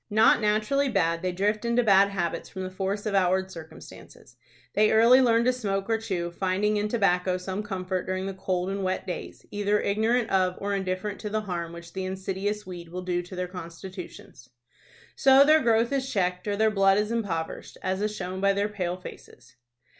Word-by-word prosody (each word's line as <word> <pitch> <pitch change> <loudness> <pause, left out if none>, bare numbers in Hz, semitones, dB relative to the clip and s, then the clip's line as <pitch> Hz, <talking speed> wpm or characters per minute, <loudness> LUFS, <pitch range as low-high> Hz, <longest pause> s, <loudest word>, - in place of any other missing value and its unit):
Not 220 +2 +5
naturally 215 +7 +1
bad, 170 -6 +1
they 185 - -1
drift 205 +4 0
into 235 +1 +2
bad 200 -2 +5
habits 175 -4 -3
from 190 -1 -6
the 185 - -5
force 195 +2 -3
of 210 - -1
outward 190 0 +2
circumstances. 160 -3 -12 0.4
They 215 0 +4
early 235 +4 +6
learn 235 -2 +3
to 255 - +3
smoke 195 -5 -2
or 225 - +2
chew, 175 -6 -3
finding 195 +4 0
in 210 0 0
tobacco 185 -4 +1
some 190 +2 -4
comfort 185 -3 -3
during 185 0 -2
the 195 - -3
cold 185 -1 -2
and 195 0 -3
wet 185 0 -2
days, 180 - -7
either 205 0 +1
ignorant 225 +3 +1
of 185 -1 +2
or 200 0 -3
indifferent 190 +1 -3
to 210 - -5
the 215 +1 -1
harm 175 -5 -4
which 170 0 -11
the 190 - -3
insidious 195 +2 -3
weed 175 -2 -8
will 180 +2 -6
do 175 -1 -1
to 175 +2 -10
their 180 0 -3
constitutions. 180 -6 -10 0.7
So 270 +1 +6
their 310 +1 +6
growth 230 0 +2
is 265 -1 -1
checked, 180 -2 -1
or 205 - 0
their 220 +1 +2
blood 195 -1 +4
is 210 +1 0
impoverished, 195 -8 -3
as 190 +1 -1
is 210 0 -1
shown 185 -1 -5
by 200 0 +4
their 200 +1 0
pale 180 -4 -3
faces. 125 -8 -13
195 Hz, 200 wpm, -26 LUFS, 185-210 Hz, 0.7 s, early